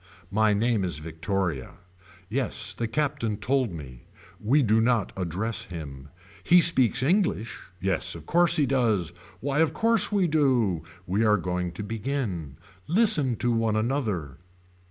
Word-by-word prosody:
My 110 +1 +3
name 110 -1 +1
is 85 -5 -1
Victoria. 80 -1 -3 0.5
Yes 110 -3 -2
the 115 +3 -3
Captain 135 -4 -1
told 125 +1 0
me. 65 -7 -10 0.3
We 135 +7 +2
do 110 0 +3
not 115 -3 +1
address 95 +5 -2
him. 70 -5 -9 0.3
He 180 +1 +6
speaks 130 -7 +3
English. 170 - 0 0.2
Yes 90 -1 -1
of 80 -2 -10
course 170 - +3
he 150 -4 +3
does. 110 -10 0 0.3
Why 140 +2 -1
of 160 -1 +2
course 225 -3 +3
we 200 -4 +2
do. 130 - +1 0.2
We 100 +5 0
are 105 -1 +4
going 90 0 -3
to 95 - -6
begin. 105 - -4 0.3
Listen 165 - +4
to 120 +2 0
one 115 -2 +1
another. 110 - -2
110 Hz, 145 wpm, -26 LUFS, 90-135 Hz, 0.5 s, He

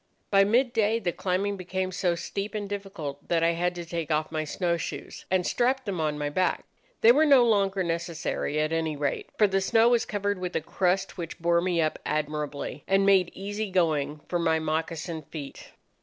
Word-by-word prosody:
By 195 -1 +6
mid 240 +5 +2
day 220 0 +2
the 185 -6 -1
climbing 195 +3 -1
became 185 +1 -3
so 180 -2 0
steep 200 +4 -4
and 205 -1 -3
difficult 195 -8 -6
that 165 -1 +1
I 165 - +4
had 175 +1 -1
to 175 -1 -6
take 165 -1 -4
off 155 0 0
my 155 -1 -1
snow 170 +3 -1
shoes, 170 - -6
and 185 -1 +1
strapped 255 +1 +1
them 190 -5 -2
on 150 -1 -1
my 150 0 -2
back. 185 +6 0 0.4
They 230 - +8
were 290 +6 +4
no 275 -5 +6
longer 195 -4 +2
necessary, 165 -3 -2
at 155 +1 0
any 160 -1 -1
rate, 145 -1 -2
for 215 - +6
the 195 -1 +1
snow 225 +4 +4
was 240 -1 +3
covered 205 -1 -2
with 180 -1 -4
a - - +1
crust 185 +4 -1
which 170 -1 -5
bore 170 0 +2
me 175 -1 0
up 155 -1 0
admirably, 150 -2 -3
and 195 0 +3
made 190 -3 +5
easy 205 +2 -4
going 155 -5 0
for 175 - -1
my 165 -1 +2
moccasined 160 0 -3
feet. 145 -4 -8
180 Hz, 200 wpm, -27 LUFS, 160-200 Hz, 0.4 s, They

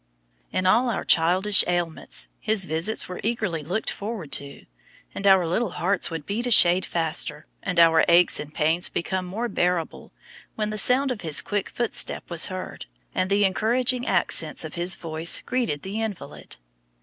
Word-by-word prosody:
In 185 - -1
all 235 +7 +3
our 230 - -3
childish 185 +5 +4
ailments 175 -2 -2
his 215 -3 -1
visits 165 +7 -2
were 180 - -7
eagerly 210 -8 -2
looked 185 +9 -2
forward 200 -7 -6
to; 140 0 0 0.5
and 200 - -2
our 190 -2 +5
little 180 +4 -1
hearts 190 +2 0
would 165 -3 -6
beat 230 +5 -2
a - - 0
shade 180 -5 +5
faster, 155 -2 -1 0.2
and 180 -3 -1
our 165 -1 +6
aches 175 +1 +4
and 150 0 -7
pains 160 +3 +1
become 185 +1 -3
more 220 +7 -3
bearable, 175 -6 -2 0.4
when 215 -1 -2
the 215 - -4
sound 260 +5 +3
of 235 - -5
his 160 -4 -1
quick 205 -2 -2
footstep 235 -5 -2
was 170 -2 +2
heard, 185 - -7 0.3
and 185 0 -1
the 200 +1 +3
encouraging 245 +6 +1
accents - - +1
of - - -8
his 175 +1 0
voice 160 0 -1
greeted 235 - -2
the 200 +4 -4
invalid. 215 -5 -6
185 Hz, 170 wpm, -24 LUFS, 170-215 Hz, 0.5 s, our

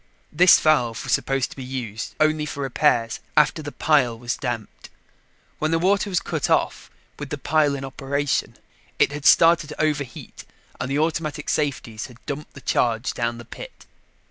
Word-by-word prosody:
This 180 +3 +6
valve 125 -7 +2
was - - -1
supposed 135 -1 0
to - - -10
be 135 - -7
used 120 -4 -5
only 155 0 +2
for 140 -1 -4
repairs, 115 -3 +1 0.2
after 150 +1 +4
the 145 -1 -6
pile 135 -8 +2
was 120 0 -3
damped. 120 -6 -5 0.7
When 155 - 0
the 165 - +2
water 200 +4 +2
was 180 - +1
cut - - -3
off - - 0 0.3
with 145 -1 -6
the 145 - -3
pile 145 0 +2
in 135 0 -5
operation, 140 +1 -2 0.4
it - - +3
had 145 0 -1
started 165 -2 +6
to 150 - -10
overheat 150 -4 -3 0.4
and 125 - -3
the 140 - 0
automatic 155 -1 -1
safeties 135 -7 -2
had 125 -3 -15
dumped 145 +1 -6
the 140 - -10
charge 115 -2 0
down 120 0 -2
the 120 - -10
pit. - - -11
140 Hz, 175 wpm, -23 LUFS, 125-155 Hz, 0.7 s, This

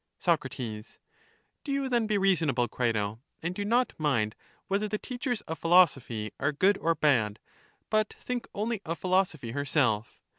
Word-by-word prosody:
Soc, 160 -6 +1
Do 110 -4 -5 0.8
you 275 -2 -1
then 240 -3 +1
be 210 -1 +2
reasonable, 160 -11 +2
Crito, 110 -3 -1 0.2
and 170 +2 -1
do 205 - -3
not 240 +4 +2
mind 120 -9 +1 0.3
whether 200 +2 0
the 210 +1 -2
teachers 245 -1 -3
of 160 -4 -6
philosophy 135 -11 +3
are 140 - +1
good 190 +7 +3
or 165 0 +1
bad, 115 -10 +2 0.5
but 215 -1 +2
think 250 -1 -4
only 215 0 -1
of 165 +2 -3
philosophy 180 -10 0
herself. 130 -5 0
165 Hz, 150 wpm, -29 LUFS, 125-210 Hz, 0.8 s, philosophy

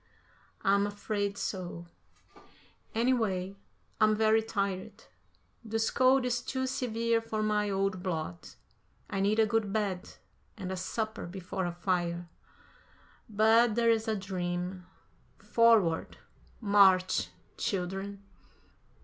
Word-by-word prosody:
"I'm 200 +1 +3
afraid 205 -1 -3
so; 175 -4 -4 1.1
anyway, 220 -6 +1 0.4
I'm 215 0 +4
very 220 +1 +4
tired. 200 -4 -3 0.6
This 225 0 -1
cold 260 0 +4
is 240 -1 0
too 260 +1 -2
severe 230 -3 0
for 220 -1 -3
my 210 -1 +1
old 195 -1 -1
blood. 160 - -4 0.6
I 195 - -1
need 205 +2 +2
a 220 - +5
good 215 -2 0
bed 200 -3 -2 0.4
and 190 -3 -5
a - - -2
supper 215 +3 -3
before 185 0 -4
a - - -2
fire. 175 -1 -1 1.0
But 220 +2 +4
that's 230 -1 +2
a 220 - +1
dream. 180 -1 -4 0.5
Forward! 225 -8 +3 0.4
March! 195 -4 +4 0.3
Children." 195 +1 -3
200 Hz, 105 wpm, -30 LUFS, 185-225 Hz, 1.1 s, a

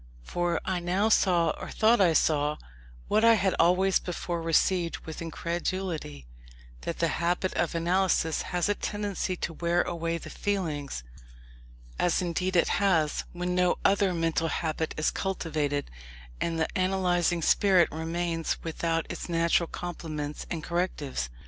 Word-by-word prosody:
For 175 - -1
I 185 -1 0
now 185 +5 +1
saw, 175 -6 +3
or - - -6
thought 225 0 +3
I 175 -4 +5
saw, 150 -1 +2 0.5
what 215 - +2
I 230 0 +7
had 195 -3 +1
always 180 +3 +4
before 175 -1 -4
received 165 +1 +2
with 160 0 -7
incredulity 170 - -3 0.6
that - - -4
the - - +2
habit 175 +2 0
of 170 0 -1
analysis 170 -1 +1
has 180 -1 -1
a 205 - +2
tendency 205 -3 -3
to 170 - -4
wear 170 +2 +1
away 170 -1 -2
the - - -9
feelings: 155 - -2 1.0
as 175 - +2
indeed 180 +1 -1
it 170 - +4
has, 165 -7 +2
when 180 0 -2
no 180 0 +2
other 195 -1 +4
mental 165 -1 0
habit 160 0 -2
is 155 - +1
cultivated, 155 -6 -2 0.5
and 165 -1 -1
the 160 - +2
analysing 180 -3 +1
spirit 185 -2 +4
remains 165 +1 -2
without 165 0 -1
its - - -6
natural 170 0 +2
complements 155 -4 -5
and 160 -2 -4
correctives. 170 - -2
170 Hz, 145 wpm, -28 LUFS, 160-185 Hz, 1.0 s, I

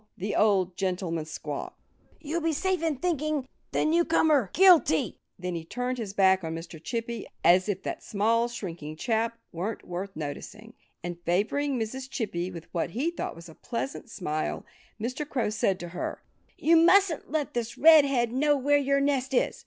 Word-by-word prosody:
the 200 +2 -3
old 190 -4 +3
gentleman 180 -4 -2
squawked. 150 -2 -6 0.4
"You'll 325 +2 -3
be 325 0 +1
safe 375 +2 0
in 325 -3 0
thinking 305 -3 -1 0.2
the - - +1
newcomer 315 - +3
guilty." 355 - +5 0.2
Then 180 0 -4
he 165 -1 -4
turned 250 +8 -3
his 215 -4 -4
back 190 -2 +4
on 160 0 -3
Mr. 165 -1 -9
Chippy, 230 0 -4 0.2
as 185 +4 +5
if 190 -2 -2
that - - -4
small, 230 +3 +1
shrinking 170 -10 -6
chap 230 +5 -1
weren't 190 +6 -4
worth 185 +3 -5
noticing. 210 +9 -7 0.3
And 175 0 -5
favoring 235 +11 0
Mrs. 260 +4 -4
Chippy 185 -9 -3
with 170 -3 -9
what 170 -1 -1
he 310 +7 +1
thought 345 - -5
was 170 +1 -11
a 160 - -12
pleasant 240 - -5
smile, 155 -7 -3 0.3
Mr. 250 +7 -3
Crow 240 -5 0
said 195 -3 +1
to 175 - -6
her, 175 - -5 0.3
"You 330 +1 +4
mustn't 355 -1 +4
let 300 0 -2
this 235 -1 -3
Red 315 0 +8
head 245 -4 +1
know 290 +2 +3
where 290 +2 +3
your 280 0 +2
nest 270 -2 0
is. - - +1
230 Hz, 175 wpm, -27 LUFS, 180-285 Hz, 0.4 s, Red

